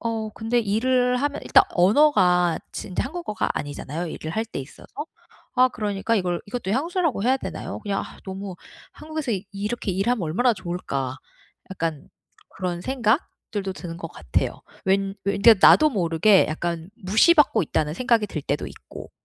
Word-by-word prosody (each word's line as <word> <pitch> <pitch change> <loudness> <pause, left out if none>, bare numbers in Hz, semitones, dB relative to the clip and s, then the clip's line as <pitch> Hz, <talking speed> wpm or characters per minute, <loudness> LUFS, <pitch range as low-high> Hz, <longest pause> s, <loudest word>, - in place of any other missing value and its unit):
어 225 -2 -2
근데 225 +2 0
일을 250 +4 +2
하면 285 +3 -1
일단 - - +6
언어가 180 - +4
지금 - - -6
이제 - - 0
한국어가 305 -6 -3
아니잖아요 145 +3 -4
일을 155 -1 -6
할 220 +5 -1
때 225 - -7
있어서. 135 +1 -10 0.7
아 255 0 +5
그러니까 210 -2 -2
이걸 180 -3 -1
이것도 230 -3 -4
향수라고 325 - 0
해야 255 +4 +3
되나요? - - -6
그냥 200 -2 -2
아 - - -11
너무 190 0 -6 0.4
'한국에서 310 -4 -4 0.2
이렇게 205 +2 -3
일하면 195 +4 0
얼마나 210 +11 +2
좋을까?' 170 -8 -4 0.5
약간 165 -5 -4 0.4
그런 180 -2 -4
생각들도 220 - -1
드는 175 -3 -7
것 170 -1 -6
같아요. 75 -6 -2 0.2
왠 195 0 +1
왜 200 +1 0
그러니까 215 -1 +7
나도 310 0 +6
모르게 185 - +4
약간 165 +1 -3 0.2
'무시받고 275 - +5
있다.'는 150 -1 -1
생각이 235 0 +2
들 155 - -4
때도 145 +1 -2
있고. - - -12
200 Hz, 355 characters per minute, -24 LUFS, 175-245 Hz, 0.7 s, 그러니까